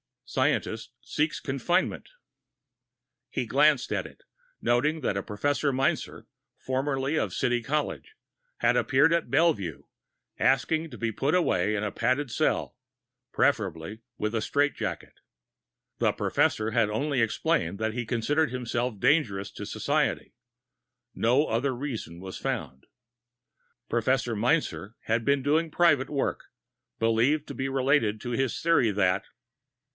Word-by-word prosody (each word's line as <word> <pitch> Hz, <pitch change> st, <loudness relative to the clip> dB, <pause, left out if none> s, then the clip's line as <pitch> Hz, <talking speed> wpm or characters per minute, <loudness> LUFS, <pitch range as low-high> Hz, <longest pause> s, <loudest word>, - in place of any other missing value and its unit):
Scientist -, -, -1 dB
Seeks -, -, -1 dB
Confinement -, -, -1 dB, 1.2 s
He -, -, -2 dB
glanced -, -, +3 dB
at -, -, -1 dB
it, -, -, -18 dB, 0.4 s
noting 150 Hz, +7 st, +1 dB
that 100 Hz, -6 st, -1 dB
a -, -, 0 dB
Professor 140 Hz, +8 st, -1 dB
Meinzer, 135 Hz, +1 st, -1 dB, 0.3 s
formerly 135 Hz, +2 st, -1 dB
of -, -, -2 dB
City 120 Hz, -1 st, +1 dB
College, 150 Hz, -, -3 dB, 0.4 s
had -, -, +3 dB
appeared 140 Hz, +4 st, +4 dB
at 170 Hz, -6 st, +1 dB
Bellevue, 135 Hz, -, +1 dB, 0.6 s
asking 155 Hz, +5 st, +2 dB
to 120 Hz, -, -10 dB
be 115 Hz, -1 st, -1 dB
put 140 Hz, -, 0 dB
away 105 Hz, -, +2 dB
in 105 Hz, -, -1 dB
a 105 Hz, -, -2 dB
padded 130 Hz, +2 st, 0 dB
cell, 155 Hz, +2 st, 0 dB, 0.6 s
preferably 100 Hz, -, 0 dB, 0.2 s
with 105 Hz, +1 st, -2 dB
a 115 Hz, -, 0 dB
strait 145 Hz, +6 st, +1 dB
jacket. -, -, -5 dB, 0.8 s
The -, -, +2 dB
Professor 110 Hz, +1 st, +1 dB
had 115 Hz, -2 st, +2 dB
only 130 Hz, +4 st, 0 dB
explained 115 Hz, -, 0 dB
that 110 Hz, 0 st, -1 dB
he 120 Hz, 0 st, -3 dB
considered 130 Hz, +6 st, +1 dB
himself 120 Hz, -3 st, -2 dB
dangerous 120 Hz, -8 st, +2 dB
to -, -, -7 dB
society. -, -, -1 dB, 0.8 s
No 125 Hz, +6 st, +3 dB
other 130 Hz, +3 st, 0 dB
reason 115 Hz, -, -5 dB
was 95 Hz, 0 st, -7 dB
found. 65 Hz, 0 st, -4 dB, 1.0 s
Professor 120 Hz, 0 st, +1 dB
Meinzer 115 Hz, -3 st, 0 dB
had 115 Hz, 0 st, -1 dB
been 140 Hz, -1 st, +2 dB
doing 160 Hz, +4 st, +2 dB
private 150 Hz, -5 st, +3 dB
work, 140 Hz, -2 st, -2 dB, 0.5 s
believed 115 Hz, +7 st, +2 dB
to -, -, -4 dB, 0.2 s
relate 130 Hz, -5 st, +2 dB
to 120 Hz, -, -5 dB
his 130 Hz, +1 st, -1 dB
theory 155 Hz, -9 st, +3 dB
that.... 95 Hz, -1 st, +1 dB
125 Hz, 130 wpm, -27 LUFS, 110-145 Hz, 1.2 s, appeared